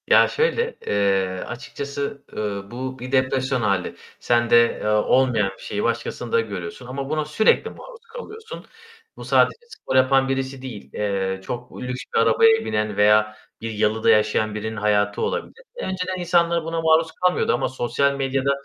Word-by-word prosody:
Ya, - - +6
şöyle, 470 +1 0
eee, 95 -2 +1
açıkçası, 140 +3 -5
ııı, 100 -2 -4
bu 130 +2 -5
bir 125 +1 -7
depresyon 130 -1 +1
hâli. 100 -4 0 0.2
Sende, 120 -1 +2 0.3
eee, - - -2
olmayan 110 0 +2
bir - - -17
şeyi 105 - -3
başkasında 120 0 -1
görüyorsun 100 +1 -7
ama 135 +2 -5
buna 155 0 -1
sürekli 155 +9 +2
maruz - - -12
kalıyorsun. 455 -1 -9 0.5
Bu - - -9
sadece - - +3
spor 130 - -5
yapan 135 +1 +4
birisi 135 0 -2
değil, 110 - -8
eee, 95 -2 -1
çok 120 +4 -7
lüks 125 0 -4
bir - - +3
arabaya 225 - +4
binen 105 -1 -1
veya 105 +1 +4 0.2
bir 115 0 -4
yalıda 110 +1 +1
yaşayan 110 0 +2
birinin 110 +1 -4
hayatı 105 0 +1
olabilir. - - -3
Önceden 185 - -3
insanlar 170 -1 +2
buna 165 0 -2
maruz 160 0 +3
kalmıyordu 180 +2 +1
ama 120 - 0
sosyal 130 +2 0
medyada 135 0 0
125 Hz, 155 wpm, -22 LUFS, 105-145 Hz, 0.5 s, Ya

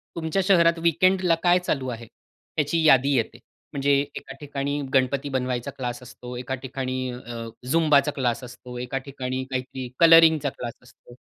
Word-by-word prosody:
तुमच्या 165 +3 -1
शहरात 170 -3 +4
वीकेंड 185 +3 +3
ला 170 -2 +4
काय 180 0 +5
चालू 135 -7 -2
आहे, 115 -1 -7 0.5
त्याची 160 +2 +1
यादी 135 0 +5
येते. 115 -3 -1 0.3
म्हणजे 140 0 +1 0.2
एका - - -8
ठिकाणी 145 0 -3
गणपती 135 +2 +1
बनवायचा 125 -2 -2
क्लास 120 -2 -4
असतो, 125 0 -10
एका 125 +1 -4
ठिकाणी 130 -1 -4
अ, 120 -1 -8 0.3
झुंबाचा 150 -2 +3
क्लास 125 -2 -1
असतो, 125 0 -10
एका 125 +2 -3
ठिकाणी 130 -2 -4
काहीतरी 130 0 -4
कलरिंग 165 -1 +8
चा 140 - +1
क्लास 120 -2 -7
असतो, 120 0 -18
135 Hz, 160 wpm, -24 LUFS, 125-160 Hz, 0.5 s, कलरिंग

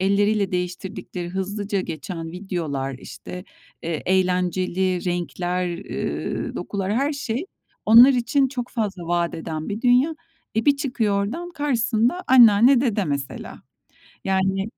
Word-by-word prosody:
elleriyle 200 +1 +2
değiştirdikleri 180 0 -4
hızlıca 195 +2 -2
geçen 165 0 -6
videolar, 160 -8 -3
işte, 180 +8 -9 0.4
eee, 165 -2 -3
eğlenceli 185 0 +1
renkler, 180 0 -2 0.2
ııı, - - -3
dokular 200 0 -3
her 280 +4 +1
şey 280 +3 -3 0.4
onlar 235 +5 +9
için 255 +2 +2
çok 245 -2 -4
fazla 205 -6 -3
vadeden 165 -2 -2
bir 210 +2 -3
dünya. 255 +6 +4 0.4
E, 225 - +1
bir 285 - +5
çıkıyor 220 -7 0
oradan 340 +12 -5
karşısında 250 0 0
anneanne, 240 +1 +7
dede 220 -7 +1
mesela. 140 -3 -5 0.6
Yani 195 +2 0
200 Hz, 120 wpm, -23 LUFS, 180-240 Hz, 0.6 s, onlar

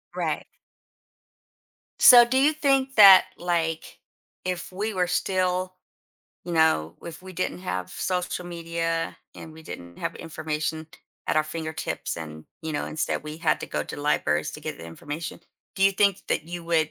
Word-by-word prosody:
Right. - - -2 1.5
So, 240 -1 +10
do 250 +2 0
you 290 +4 +4
think 270 -3 +1
that, 195 -4 +10
like, 165 -2 -2 0.5
if 180 -1 -3
we 210 +4 -3
were 180 -2 +1
still 185 0 0 0.7
you 175 - -4
know, 160 - +2
w - - -8
if 170 +2 -10
we 185 0 -10
didn't 185 0 -3
have 95 - -4
social 180 -1 -2
media 165 -1 -3 0.2
and 160 - -10
we 160 +1 -13
didn't 85 - -9
have - - -3
information 155 0 -4 0.4
at - - 0
our 155 - +5
fingertips 160 0 -4
and, 80 -1 -8 0.2
you 160 -1 -4
know, 145 - -2
instead 155 - -2
we 150 0 -6
had - - +1
to - - -5
go - - -2
to - - -7
libraries 75 - 0
to - - -9
get - - -6
the - - -9
information, 145 - -7 0.3
do 190 - -2
you 195 - +6
think 200 0 +2
that - - 0
you 175 0 -6
would 160 -2 +1
170 Hz, 170 wpm, -25 LUFS, 155-185 Hz, 1.5 s, So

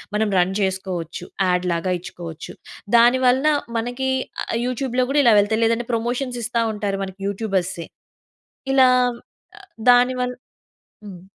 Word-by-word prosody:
మనం 215 0 +1
రన్ 180 +1 +2
చేసుకోవచ్చు. 185 -3 -3 0.2
యాడ్ 180 0 +1
లాగా 180 +2 -1
ఇచ్చుకోవచ్చు. 170 -2 -9 0.4
దాని 240 +2 +5
వలన 260 +4 +3 0.3
మనకి 245 +3 -3 0.3
ఆహ్, - - -4
యూట్యూబ్‌లో 255 0 -1
కూడా 290 0 +4
ఇలా 230 - +6
వెళ్తాయి. 220 +2 +1
లేదంటే 230 +1 0
ప్రమోషన్స్ 245 +2 -2
ఇస్తా 235 0 -1
ఉంటారు 200 -2 -3
మనకి 190 0 -8
యూట్యూబర్సే. 195 -4 -3 0.9
ఇలా 260 -1 +6 1.0
దానివల్ 250 0 +3 0.7
హ్మ్. 180 -3 -10
225 Hz, 120 wpm, -21 LUFS, 190-250 Hz, 1.0 s, ఇలా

